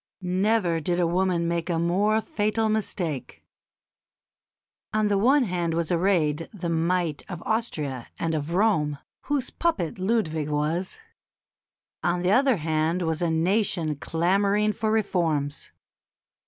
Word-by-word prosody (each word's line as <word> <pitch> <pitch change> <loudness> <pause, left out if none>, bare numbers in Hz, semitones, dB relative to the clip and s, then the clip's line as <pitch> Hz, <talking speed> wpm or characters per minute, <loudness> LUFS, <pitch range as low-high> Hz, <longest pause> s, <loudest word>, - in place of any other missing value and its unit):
Never 185 -1 +1
did 175 +3 -1
woman 175 0 +1
make 170 0 -2
a 170 - +1
more 200 +6 +2
fatal 220 -4 0
mistake. 180 - -2 1.5
On 215 -1 +2
the 200 - +2
one 265 +6 +4
hand 175 -5 -1
was 170 0 -1
arrayed 165 -3 +1
the 180 -5 -4
might 165 -2 0
of 175 -3 -6
Austria 150 - -2
and 165 -1 -1
of 155 +2 -2
Rome, 170 -8 +2 0.3
whose 280 -3 -1
puppet 195 - -1
Ludwig 180 -7 0
was; 155 - -1 1.0
on 175 0 0
the 180 - +2
other 260 +1 +4
hand 160 +2 0
was 160 -1 -1
a 170 - +1
nation 170 -1 +1
clamouring 200 +8 +1
for 215 +2 -1
reforms. 165 -9 0
175 Hz, 125 wpm, -25 LUFS, 160-210 Hz, 1.5 s, one